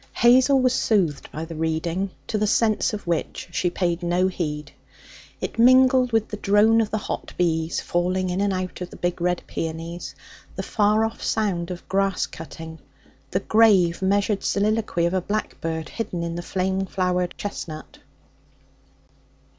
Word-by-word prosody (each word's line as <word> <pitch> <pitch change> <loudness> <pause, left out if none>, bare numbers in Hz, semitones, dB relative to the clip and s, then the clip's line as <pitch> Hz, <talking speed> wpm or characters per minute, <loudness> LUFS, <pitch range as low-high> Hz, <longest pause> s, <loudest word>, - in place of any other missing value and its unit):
Hazel 260 +3 +5
was 255 -1 +3
soothed 185 - +1
by 155 +2 -5
the 165 - -8
reading, 160 +4 -1 0.2
to 215 - -2
the 210 - +1
sense 220 -1 +2
of 210 -1 -6
which 170 +1 -2
she 175 +1 0
paid 175 -1 -1
no 175 +2 +2
heed. 150 -5 -4 0.7
It - - -5
mingled 255 +1 +6
with 225 -1 +1
the 210 - -5
drone 210 +3 +4
of 215 - -1
the 215 - -1
hot 210 - -5
bees 165 -2 0
falling 180 +1 0
in 185 +2 -1
and 200 0 +1
out 185 -1 -4
of 180 - -4
the - - -12
big 175 0 -2
red 180 0 0
peonies, 165 +2 -5 0.4
the - - -4
far 215 +1 +2
off 225 - -5
sound 190 -6 -1
of 180 -1 -7
grass 195 -1 +1
cutting, 160 0 -9 0.5
the 185 - -1
grave, 195 -6 +4
measured 200 +1 +1
soliloquy 210 -4 +1
of 170 - 0
a 185 - +1
blackbird 165 -5 -3
hidden 180 -7 -4
in 170 0 -3
the 175 - -4
flame 190 +2 -1
flowered 180 -1 -1
chestnut. 160 -6 -7
185 Hz, 160 wpm, -24 LUFS, 170-215 Hz, 0.7 s, mingled